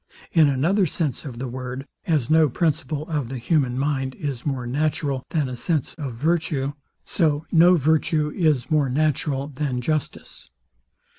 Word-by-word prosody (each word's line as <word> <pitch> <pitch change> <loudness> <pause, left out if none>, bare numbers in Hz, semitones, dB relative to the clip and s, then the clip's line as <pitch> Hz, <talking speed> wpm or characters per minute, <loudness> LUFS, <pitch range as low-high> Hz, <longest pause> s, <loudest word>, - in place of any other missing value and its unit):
In 160 -4 +5
another 170 +9 +2
sense 155 -2 -2
of 125 -5 -7
the 130 +2 -4
word; 130 +2 -6 0.2
as 155 -8 +1
no 155 0 +4
principle 155 +1 -1
of 150 -7 -2
the 135 - -4
human 125 0 +1
mind 135 -1 -1
is 140 -6 -4
more 130 -4 -2
natural 140 0 -1
than 150 -4 0
a 125 - -5
sense 155 +2 -1
of 140 -7 -6
virtue; 150 -1 0 0.3
so 155 -3 +1
no 175 +2 +6
virtue 155 0 +1
is 155 -5 +1
more 150 -3 +3
natural 140 0 0
than 140 -3 -3
justice. 155 +3 -3
145 Hz, 155 wpm, -23 LUFS, 130-155 Hz, 0.3 s, no